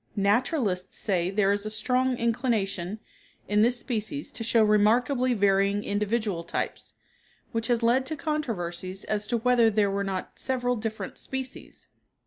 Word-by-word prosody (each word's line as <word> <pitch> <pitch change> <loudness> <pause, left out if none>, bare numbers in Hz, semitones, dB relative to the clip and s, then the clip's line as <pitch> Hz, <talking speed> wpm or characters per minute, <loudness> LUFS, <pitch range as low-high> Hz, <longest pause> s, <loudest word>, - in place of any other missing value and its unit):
Naturalists 205 - +1
say 180 -3 0
there 200 0 +2
is 200 0 0
a 215 - -3
strong 250 +3 +1
inclination 220 -5 -1 0.5
in 210 +1 +3
this 240 +2 +3
species 245 +5 -3
to 230 - -5
show 230 0 +4
remarkably 240 +5 +3
varying 200 0 +2
individual 205 -3 -1
types, 170 - -4 0.6
which 230 0 -1
has 240 -1 +1
led 255 +3 +3
to 315 - -2
controversies 195 - -3
as 210 -1 -2
to 240 - +1
whether 235 -1 +4
there 205 -2 +2
were 200 0 -1
not 190 -2 -4
several 250 -1 0
different 220 -1 -4
species. 265 -1 -6
220 Hz, 145 wpm, -27 LUFS, 200-245 Hz, 0.6 s, show